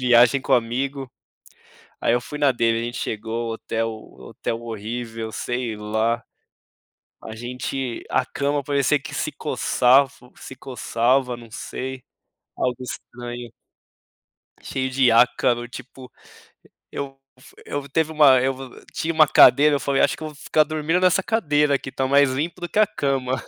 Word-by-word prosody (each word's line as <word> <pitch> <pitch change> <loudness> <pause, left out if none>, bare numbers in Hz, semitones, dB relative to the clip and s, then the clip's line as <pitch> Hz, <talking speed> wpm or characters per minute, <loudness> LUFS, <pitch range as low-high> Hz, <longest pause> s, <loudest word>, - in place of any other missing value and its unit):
Viagem 125 +1 +5
com - - -2
amigo, 130 +3 0 0.9
aí - - +2
eu 120 - +1
fui 150 +4 -8
na 145 -2 +4
dele, 115 -1 +1
a - - -4
gente 120 0 -5
chegou 115 +2 -3
o - - -2
hotel 115 0 -3 0.3
hotel 115 - -5
horrível, 115 0 -5
sei 120 -2 -3
lá, 110 +2 -1 1.0
a 110 - -8
gente 125 +1 -4
a 130 - +1
cama 140 +2 -1
parecia 140 +1 +2
que - - -9
se - - -2
coçava 135 +3 +3 0.3
se 135 - -10
coçava, 125 0 0
não 115 -1 -14
sei, 130 +4 -6 0.5
algo 125 -1 -1
estranho. 120 -1 -8 1.1
Cheio 130 0 -3
de 130 -2 +3
ácaro, 120 +1 +3
tipo, 125 +1 -11 0.8
eu 140 -1 -5 0.2
fu - - -18
eu 145 -1 -5
teve 160 +2 0
uma 145 -4 +6
eu 130 +1 +1
vo 130 -1 -11
tinha 165 +1 -2
uma 155 -1 +6
cadeira, 150 +1 +6
eu - - -4
falei: 140 -1 +1
"Acho - - +3
que - - -12
eu 155 - -4
vou 150 - -13
ficar 155 +1 +2
dormindo 155 +3 -1
nessa 185 +1 +3
cadeira 150 -10 +2
aqui, 135 - -3
tá 135 0 -1
mais 140 0 +4
limpo 155 +7 -3
do 175 - -4
que - - -2
a 215 - +6
cama". 135 - -2
130 Hz, 160 wpm, -22 LUFS, 120-140 Hz, 1.1 s, uma